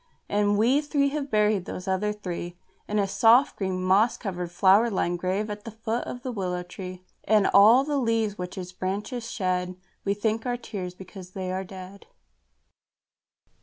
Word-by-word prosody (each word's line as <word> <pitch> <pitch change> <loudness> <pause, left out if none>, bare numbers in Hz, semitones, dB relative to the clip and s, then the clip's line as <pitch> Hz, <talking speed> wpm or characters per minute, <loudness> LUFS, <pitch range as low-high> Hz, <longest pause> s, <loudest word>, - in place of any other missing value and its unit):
And 205 0 +2
we 250 +7 +3
three 285 -1 +1
have 285 -1 -3
buried 210 -4 +2
those 185 0 -7
other 190 +2 0
three 175 -4 -6 0.3
In 210 - -1
a 200 -1 +2
soft, 235 +7 +4
green, 190 -2 -2
moss 200 +6 +3
covered, 180 -5 -4
flower 195 +6 +5
lined 175 -4 -1
grave 190 +4 -1
at 210 -1 -6
the 230 - -7
foot 225 +2 -3
of 245 - -7
the 255 - -3
willow 180 -5 -3
tree. 185 0 -9 0.2
And 215 -1 +4
all 220 +6 +7
the 290 0 -1
leaves 225 -4 0
which 180 0 -6
its 180 -1 -6
branches 205 +6 -4
shed 185 -3 -1 0.3
We 200 0 0
think 220 +2 -1
are 245 0 0
tears 185 -6 -6
because 185 0 -11
they 185 -1 -4
are 190 +1 -2
dead. 190 +1 -11
200 Hz, 175 wpm, -26 LUFS, 185-225 Hz, 0.3 s, all